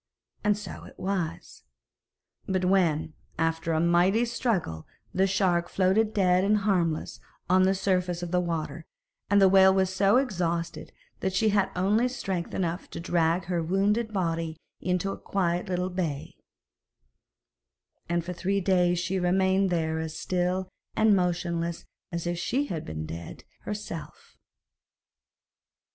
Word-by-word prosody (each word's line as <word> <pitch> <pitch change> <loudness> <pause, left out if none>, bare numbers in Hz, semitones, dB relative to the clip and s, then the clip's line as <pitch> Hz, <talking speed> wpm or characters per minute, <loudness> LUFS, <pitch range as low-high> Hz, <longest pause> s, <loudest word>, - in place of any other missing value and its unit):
And 210 -1 +3
so 210 -3 -8
it - - -14
was. 185 -4 -3 0.9
But 185 -1 0
when, 170 -5 +2 0.2
after 165 0 0
a 160 - +2
mighty 175 +7 +3
struggle, 220 - -2 0.3
the 190 +1 +3
shark 185 -3 +1
floated 195 +3 +2
dead 185 -3 +3
and 210 +2 +3
harmless 180 -6 0 0.3
on 185 +1 +4
the 190 +1 +3
surface 180 -2 0
of 175 - -5
the 180 - +3
water, 170 -3 -3 0.4
the 200 -1 +6
whale 190 0 +7
was 190 -1 +1
so 195 +4 +4
exhausted 170 -9 -2 0.3
that 190 - -1
she 215 +3 +3
had 200 -2 +2
only 205 +7 +2
strength 195 -9 -4
enough 175 0 -2
to - - -7
drag 170 +1 +1
her 175 -1 -1
wounded 205 +6 +1
body 165 -4 -2 0.2
into 180 +1 -1
a - - -7
quiet 180 -2 -1
little 180 0 -1
bay, 165 -6 -3 1.8
and 170 -1 0
for 180 - -4
three 195 +3 0
days 180 -2 +2
she 185 +2 -1
remained 190 +2 +2
there 160 -2 0
as 160 -1 -4
still 185 +1 -1 0.3
and 220 -1 +5
motionless 170 -2 -1 0.3
as 170 -1 -3
if 175 0 -2
she 275 +10 0
had 165 - -5
been 80 0 -5
dead 85 +1 -8 0.2
herself. 205 -6 -7
180 Hz, 140 wpm, -27 LUFS, 170-195 Hz, 1.8 s, whale